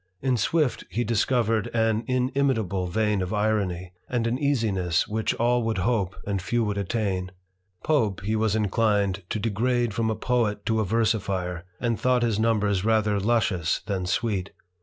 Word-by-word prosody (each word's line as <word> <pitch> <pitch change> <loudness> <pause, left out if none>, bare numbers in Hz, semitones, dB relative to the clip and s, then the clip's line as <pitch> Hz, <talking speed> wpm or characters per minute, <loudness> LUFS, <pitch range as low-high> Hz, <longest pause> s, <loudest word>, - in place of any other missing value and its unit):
In 130 -1 +1
Swift 145 +4 +1
he 120 - -1
discovered 115 -1 +1
an 110 0 +2
inimitable 125 -7 0
vein 105 +2 0
of 90 0 -3
irony, 100 -4 -1 0.2
and 120 -2 0
an 120 +2 0
easiness 105 - +1
which 110 +1 -1
all 120 +1 +2
would 115 -2 -1
hope 100 -1 0
and 100 -2 -1
few 115 +6 0
would 105 -2 -1
attain. 95 -2 -1 0.5
Pope 110 -12 +1
he 105 +3 -1
was 110 -1 +1
inclined 105 -2 +1
to - - -1
degrade 115 +2 0
from 110 +1 0
a 110 - 0
poet 110 -5 0
to 110 -1 +1
a 110 - +1
versifier, 100 -5 -1
and 120 -2 -1
thought 125 -1 +2
his 110 -3 +1
numbers 105 -4 +1
rather 110 -2 +2
luscious 100 -6 +1
than 95 -3 -3
sweet. 100 -2 -1
110 Hz, 160 wpm, -25 LUFS, 100-115 Hz, 0.5 s, an